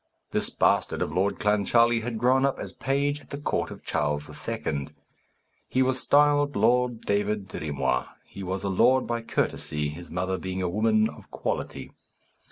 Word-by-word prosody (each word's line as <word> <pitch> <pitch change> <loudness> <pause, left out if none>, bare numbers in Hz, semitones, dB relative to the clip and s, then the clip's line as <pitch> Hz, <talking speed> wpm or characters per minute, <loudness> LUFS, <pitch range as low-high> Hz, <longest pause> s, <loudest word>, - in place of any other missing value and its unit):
This - - +1
bastard - - +2
of 75 - -5
Lord 95 +3 +1
Clancharlie 115 +3 +3
had 115 0 -3
grown 130 +3 +3
up 140 -1 +1
as - - -7
page 140 +2 0
at - - -19
the 140 - -5
court 145 - -1
of - - -11
Charles 75 0 -1 0.2
II. 70 -1 -2 0.8
He 130 - +3
was 130 0 0
styled 145 0 +4
Lord 125 -1 +2
David 105 0 -1
Dirry 80 -4 -5
Moir: 65 -3 0 0.2
he 100 - -10
was 95 +1 -3
a 100 - -1
lord 125 +7 +4
by 120 0 -2
courtesy, 75 -9 -1
his 80 +2 -9
mother 90 +2 -2
being 95 0 -4
a - - +1
woman 110 +3 +3
of - - -12
quality. - - -4
110 Hz, 175 wpm, -26 LUFS, 90-130 Hz, 0.8 s, styled